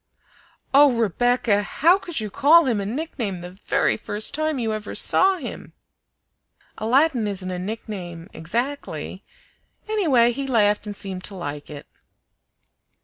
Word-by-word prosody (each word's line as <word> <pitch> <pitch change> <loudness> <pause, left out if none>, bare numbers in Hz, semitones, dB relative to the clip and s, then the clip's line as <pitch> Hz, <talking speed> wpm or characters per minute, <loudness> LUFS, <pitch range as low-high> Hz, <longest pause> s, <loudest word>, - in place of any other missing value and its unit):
"Oh, 285 0 +7
Rebecca! 230 -1 +1
how 330 - +3
could 345 -8 -4
you 215 -2 -4
call 305 - +5
him 230 -6 0
a 195 - -4
nickname 230 - -4
the 175 0 -8
very 190 +3 0
first 215 +2 +1
time 310 0 -1
you 225 -3 -1
ever 215 -1 -6
saw 380 0 +3
him?" 275 -8 -8 1.1
"Aladdin 245 +1 +2
isn't 190 -2 -4
a 180 - -4
nickname 185 -4 -6
exactly; 240 - -4 0.6
anyway, 300 - +3
he 270 +3 -4
laughed 210 -4 +2
and 205 - -5
seemed 190 -2 -6
to 200 - -7
like 145 -5 -6
it." 145 -1 -9
225 Hz, 140 wpm, -23 LUFS, 195-275 Hz, 1.1 s, Oh